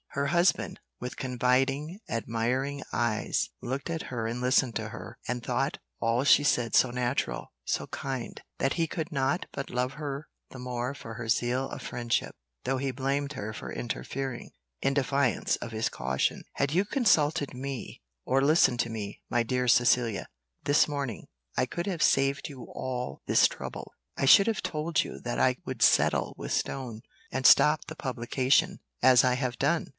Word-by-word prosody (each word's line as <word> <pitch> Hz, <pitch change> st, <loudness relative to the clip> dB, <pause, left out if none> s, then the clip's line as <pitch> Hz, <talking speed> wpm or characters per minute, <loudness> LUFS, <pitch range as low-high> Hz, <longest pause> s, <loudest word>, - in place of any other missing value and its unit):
Her 140 Hz, 0 st, 0 dB
husband, 175 Hz, +3 st, +2 dB, 0.2 s
with 125 Hz, 0 st, -5 dB
confiding, 135 Hz, -, 0 dB
admiring 125 Hz, +5 st, -1 dB
eyes, 115 Hz, -2 st, 0 dB
looked 135 Hz, +6 st, -4 dB
at 165 Hz, -1 st, -2 dB
her 115 Hz, -3 st, -2 dB
and 120 Hz, +2 st, -3 dB
listened 125 Hz, -1 st, +2 dB
to -, -, -3 dB
her, -, -, -9 dB
and 125 Hz, 0 st, -2 dB
thought -, -, -1 dB, 0.2 s
all 115 Hz, +3 st, +2 dB
she 145 Hz, -, +6 dB
said 120 Hz, -5 st, +2 dB
so 130 Hz, -, +5 dB
natural, 120 Hz, -, -2 dB
so -, -, -2 dB
kind, 130 Hz, -3 st, -5 dB, 0.2 s
that 135 Hz, -, +1 dB
he 165 Hz, -1 st, 0 dB
could 160 Hz, +1 st, -4 dB
not 140 Hz, +4 st, 0 dB
but 140 Hz, -, -5 dB
love 125 Hz, +1 st, -1 dB
her 145 Hz, 0 st, -5 dB, 0.2 s
the 130 Hz, -, -10 dB
more 125 Hz, +1 st, -3 dB
for 115 Hz, -5 st, -9 dB
her 115 Hz, 0 st, -6 dB
zeal 125 Hz, +3 st, +1 dB
of -, -, -7 dB
friendship, 120 Hz, -1 st, -1 dB, 0.3 s
though 135 Hz, -, +1 dB
he 135 Hz, +1 st, -1 dB
blamed 140 Hz, +2 st, -1 dB
her 110 Hz, -5 st, -5 dB
for 105 Hz, -, -7 dB
interfering, 130 Hz, +1 st, -4 dB, 0.3 s
in 135 Hz, 0 st, +1 dB
defiance 140 Hz, -2 st, +1 dB
of 115 Hz, -, -7 dB
his 110 Hz, 0 st, 0 dB
caution, 65 Hz, +1 st, -1 dB
"Had 140 Hz, +1 st, 0 dB
you 185 Hz, +4 st, +3 dB
consulted 160 Hz, -, +2 dB
me, 135 Hz, 0 st, -6 dB, 0.2 s
or 135 Hz, +1 st, +2 dB
listened 140 Hz, -4 st, +4 dB
to 115 Hz, -, -3 dB
me, 105 Hz, -3 st, -6 dB
my 120 Hz, -1 st, +2 dB
dear 125 Hz, +2 st, -1 dB
Cecilia, 120 Hz, -3 st, +3 dB, 0.4 s
this 145 Hz, +1 st, +4 dB
morning, 140 Hz, -6 st, -4 dB, 0.3 s
I -, -, +2 dB
could 170 Hz, +6 st, -4 dB
have 175 Hz, -6 st, -1 dB
saved 135 Hz, +2 st, +2 dB
you 130 Hz, -4 st, -9 dB
all 125 Hz, -1 st, -5 dB
this -, -, +6 dB
trouble; -, -, -8 dB, 0.2 s
I -, -, +1 dB
should 200 Hz, +9 st, +8 dB
have 225 Hz, -4 st, 0 dB
told 155 Hz, +1 st, 0 dB
you -, -, -8 dB
that 120 Hz, 0 st, -3 dB
I 130 Hz, -1 st, +3 dB
would -, -, -2 dB
settle -, -, +4 dB
with -, -, -6 dB
Stone, 120 Hz, -5 st, -2 dB, 0.3 s
and 130 Hz, 0 st, -2 dB
stop 150 Hz, +4 st, +6 dB
the 160 Hz, -, -8 dB
publication, 135 Hz, +7 st, +1 dB, 0.2 s
as 125 Hz, -1 st, +7 dB
I 125 Hz, -1 st, +3 dB
have 125 Hz, -3 st, -2 dB
done." -, -, +1 dB
130 Hz, 175 wpm, -28 LUFS, 120-140 Hz, 0.4 s, should